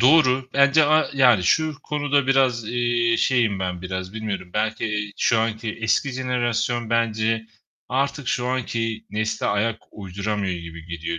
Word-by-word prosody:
doğru. 130 -1 +4
Bence 140 +2 +5
a 155 +1 +3
yani, 125 -7 +5
şu 155 - +2
konuda 145 -2 0
biraz, 130 -4 +2
eee, 120 -1 +1
şeyim 115 -7 +2
ben 90 -1 -3
biraz. 95 0 -5
Bilmiyorum. 105 -5 -4
Belki, 110 +1 -1
eee, 105 -1 -3
şu 115 - +2
anki 110 0 -2
eski 115 +5 +1
jenerasyon 120 -2 -1
bence 115 -1 0 0.4
artık 140 0 -1
şu 125 0 0
anki 115 -3 -2
nesle 110 +1 -2
ayak 110 +2 0
uyduramıyor 100 0 -3
gibi 85 -1 -10
geliyor. 85 0 -4
115 Hz, 145 wpm, -23 LUFS, 105-130 Hz, 0.4 s, Bence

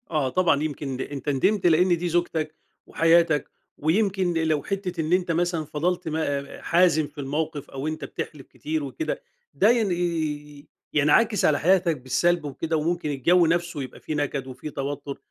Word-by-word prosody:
آه، 150 -5 +1
طبعًا. 160 -2 +2
يمكن 140 -4 -4
أنت 145 0 -4
ندمت 180 +9 +1
لإن 175 +2 +4
دي 175 +1 -2
زوجتك 165 -2 -1 0.3
وحياتك 165 -2 +3 0.3
ويمكن 185 +2 +1
لو 160 -3 +1
حتّة 185 -4 -3
إن 160 +2 -1
أنت 180 -2 +2
مثلًا 170 -1 0
فَضَلت 175 +4 -2
م 160 0 -1 0.4
حازم 170 -3 +3
في 145 0 -9
الموقف 145 +1 -3
أو 135 +2 -5
أنت 155 0 -4
بتحلِف 145 -4 -7
كتير 155 0 -4
وكده، 145 - -4 0.3
ده 205 - +4
ين 230 -5 +2
ي - - +1 0.6
ي 145 - -18 0.3
ينعكس 200 +9 +3
على 145 -2 +3
حياتك 175 -2 +3
بالسَلب 165 +6 +1
وكده 155 +3 -2
وممكن 165 +1 -1
الجَو 170 +6 +3
نفسه 170 -2 0
يبقى 130 - -10
فيه 155 - -4
نَكَد 145 -2 -2
وفيه 130 +4 -7
توتُّر. 140 0 -5
160 Hz, 165 wpm, -25 LUFS, 145-175 Hz, 0.6 s, لإن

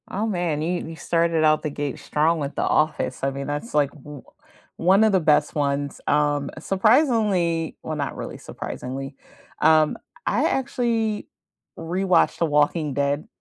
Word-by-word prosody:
Oh 205 +3 -2
man, 175 -7 -1
you 175 +3 -2
you 165 - -7
started 165 -1 +1
out 155 0 +4
the 155 - -2
gate 145 -2 -4
strong 160 +2 +1
with 140 -1 -4
The - - -1
Office. 155 -2 0
I 135 - +2
mean, 140 0 -5
that's 145 +11 -4
like 145 -2 +2
o 150 -2 -10 0.5
one 190 +5 +4
of 220 - +4
the 190 - +3
best 150 -2 +2
ones. 140 -1 -2
Um, 145 -1 +1
surprisingly 195 - +2
well, 155 - -4
not 145 -2 -3
really - - -6
surprisingly, 135 +2 -7 0.5
um, 155 -1 +4 0.3
I - - +1
actually 235 -5 -1 0.5
rewatched 180 +3 +1
The 170 - +3
Walking 150 0 +1
Dead. 140 - -1
155 Hz, 155 wpm, -23 LUFS, 145-185 Hz, 0.5 s, out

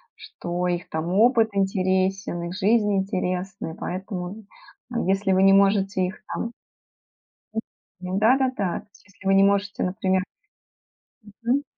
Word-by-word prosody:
Что 175 +1 -4
их 175 0 -2
там 160 +3 -2
опыт 225 +1 +4
интересен, 190 -2 0
их 170 +1 -4
жизнь 210 0 +2
интересна. 185 -2 -2
И - - -10
поэтому, 185 +2 -5 0.5
э, - - -5
если 195 0 +2
вы 190 0 +4
не 195 0 +7
можете 195 -1 +3
их 190 +3 -7
там 230 - -3 1.5
м. 185 +2 -2
Да-да-да. 255 -4 +2
То - - -25
есть 225 - -22
если 195 -1 -19
вы 195 - +4
не 195 - +6
можете, 200 0 +1
например 190 -1 0 1.2
мгм. 265 +5 +2
195 Hz, 140 wpm, -24 LUFS, 185-205 Hz, 1.5 s, не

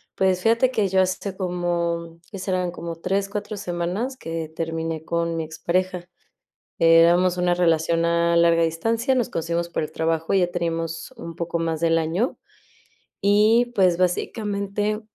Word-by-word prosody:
Pues 185 -1 +1
fíjate 230 +4 +3
que 210 -5 +1
yo 190 0 +3
hace 185 +1 -2
como, 170 -2 -2
¿qué 195 - -7
serán?, 185 -2 -1
como 170 -1 -6
3, 195 +3 -1
4 205 +1 -5
semanas 195 +7 -3
que 165 -1 -5
terminé 165 -1 -3
con 170 0 -1
mi 160 - -1
expareja. 175 +3 -2 0.7
Éramos 170 +2 +5
una 180 0 +2
relación 165 -1 +2
a 170 0 +2
larga 170 0 +4
distancia, 225 - 0
nos 245 -4 0
conocimos 170 +1 -2
por 170 - -2
el 155 - -4
trabajo, 160 0 -1
y - - +5
ya 180 - +3
teníamos 165 +2 -3
un 165 - -8
poco 170 0 -2
más 165 -1 -2
del 165 0 +3
año, 170 - -1 0.9
y 215 +4 +4
pues 180 -3 +4
básicamente, 205 +2 -1
175 Hz, 155 wpm, -23 LUFS, 165-195 Hz, 0.9 s, Éramos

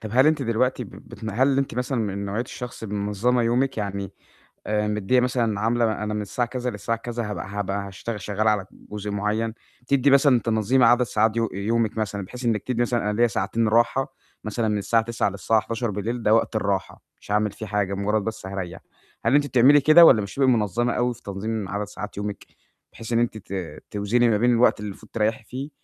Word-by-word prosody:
طَب 110 -2 -7
هل 130 +4 +5
أنتِ 155 -3 +2
دلوقتي 125 +2 0
بتن 110 -1 -9
هل 130 +5 +2
أنتِ 135 -4 -1
مثلًا 125 0 -1
من 100 -2 -2
نوعية 100 +3 -2
الشخص 125 -2 -8
المنظمة 105 +4 0
يومِك؟ 125 +3 +1
يعني 100 -1 -4 0.6
آآ 105 0 0
مدّيّة 105 +4 +1
مثلًا 120 -4 0
عاملة 115 -1 +1
أنا 105 0 -2
من 105 - -2
الساعة 120 +4 -2
كذا 125 0 -3
للساعة 115 +1 -3
كذا 115 -1 -4
هابقى 100 - -5
هابقى 100 0 -3
هاشتغ 105 +3 -6
شغّالة 105 +2 0
على 105 -3 0
جزء 105 0 -7
معيّن. 105 +2 -1 0.3
بتدّي 140 +2 +2
مثلًا 140 -2 +5
تنظيم 115 +3 +2
عدد 120 +1 +5
ساعات 110 -1 +1
يو 115 -1 +1
يومِك 110 +3 -1
مثلًا 100 -2 -2
بحيث 125 +5 -8
إنّك 110 -3 +1
تدي 120 -2 -1
مثلًا 120 -1 0
أنا 105 - -2
ليّا 120 0 +5
ساعتين 110 +2 -1
راحة 120 +5 +2 0.3
مثلًا 110 +1 -2
من 105 -1 0
الساعة 110 +3 +1
21:00 115 -3 -1
للساعة 100 +3 +1
23:00 115 0 -3
ده 105 - +4
وقت 115 0 +2
الراحة، 100 -3 -2 0.2
مش - - -9
هاعمل 105 -1 +2
فيه 110 +2 -8
حاجة، 100 -1 -1
مجرد 100 +1 0
بس 110 -3 -5
هاريّح. 95 -2 -5 0.5
هل 120 +5 +4
أنتِ 145 0 +3
بتعملي 135 +3 +5
كده 155 +4 +8
والَا 110 - +7
مش 100 -1 -6
بتبقي 135 -1 +2
منظّمة 120 +1 +1
أوي 125 0 0
في 120 - -18
تنظيم 100 +1 -4
عدد 105 +1 -2
ساعات 105 0 -8
يومِك؟ 105 0 -5 0.5
بحيث 115 +1 -6
إن 115 - +3
أنتِ 120 -2 0
ت 90 -6 -7
توزني 115 +4 +2
ما 105 - +3
بين 120 +3 +3
الوقت 120 -2 +3
اللي 105 - -5
المفروض 105 +2 -12
تريّحي 110 0 -1
فيه 135 +6 -6
110 Hz, 205 wpm, -24 LUFS, 105-120 Hz, 0.6 s, كده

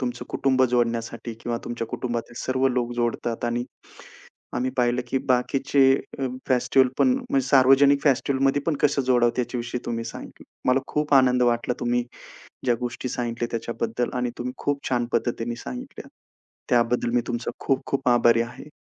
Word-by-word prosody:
तुमचं 125 -2 -3
कुटुंब 130 -1 +1
जोडण्यासाठी 115 -1 -1
किंवा 120 0 -2
तुमच्या 120 -1 -4
कुटुंबातले 120 -1 -4
सर्व 130 +1 +1
लोक 120 -1 -1
जोडतात 120 0 -1
आणि 120 +1 -1 0.9
आम्ही 130 +1 0
पाहिलं 125 0 +2
की 135 - +1
बाकीचे 135 +2 +1 0.4
अ, 135 - -1 0.2
फेस्टिव्हल 130 +1 +3
पण 255 - +4 0.2
म्हणजे 135 -1 +1
सार्वजनिक 140 +1 +5
फेस्टिव्हलमध्ये 135 0 +2
पण 165 - +2
कसं 140 -1 +3
जोडावतं 125 -1 +2
याच्याविषयी 120 0 -3
तुम्ही 115 -1 -2
सांगितलं. - - -9 0.2
मला 130 +1 +4
खूप 150 -1 0
आनंद 125 -2 +5
वाटला 120 0 +1
तुम्ही 120 0 0 0.6
ज्या 120 -2 +3
गोष्टी 125 +1 -4
सांगितल्या 120 -1 -3
त्याच्याबद्दल 115 +1 -2
आणि 125 -1 0
तुम्ही 125 +1 -3
खूप 145 -1 -1
छान 120 -2 +1
पद्धतीने 120 0 -1
सांगितल्या 125 - -7 0.6
त्याबद्दल 120 0 +2
मी 120 - +3
तुमचं 120 0 -3
खूप-खूप 135 0 -1
आभारी 120 -1 +4
आहे. 120 +5 -7
125 Hz, 150 wpm, -24 LUFS, 120-130 Hz, 0.9 s, सार्वजनिक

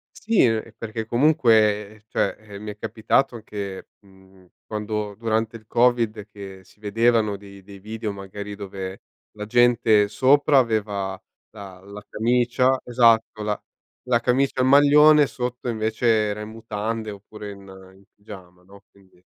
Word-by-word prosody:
Sì, 220 -1 +2
ehm, 115 -1 0
perché 110 0 -5
comunque 110 -6 +2
cioè, 100 - 0
eh, 105 -2 -11
mi 105 0 -6
è 105 - -12
capitato 120 +4 0
anche 100 -3 -7
mhmm, 95 -1 -22 0.2
quando 105 -1 -4
durante 110 +1 -2
il 110 -1 -22
covid 115 -3 +1
che 95 -2 -10
si 105 - -24
vedevano 110 0 +1
di 100 0 -14
dei 100 0 -13
video 110 +1 -5
magari 100 +1 -8
dove 95 -1 -7 0.3
la 105 0 -7
gente 115 -3 +3
sopra 140 +6 +3
aveva 105 -6 -1 0.3
la 100 -4 -11
la 100 +1 -11
camicia 125 +3 +1
esatto 115 -3 +2
la 105 0 -2 0.5
la 120 -1 +3
camicia 130 +2 +1
e - - +4
il - - +2
maglione, 145 +1 +6
sotto 125 0 -5
invece 110 +1 -2
era 105 -2 +2
in 105 - -7
mutande 110 0 -5
oppure 105 +1 -10
in 100 - -11 0.4
in 95 - -21
pigiama, 95 -4 -13
no, 100 +2 -17
quindi 95 -2 -25
110 Hz, 150 wpm, -23 LUFS, 100-120 Hz, 0.5 s, maglione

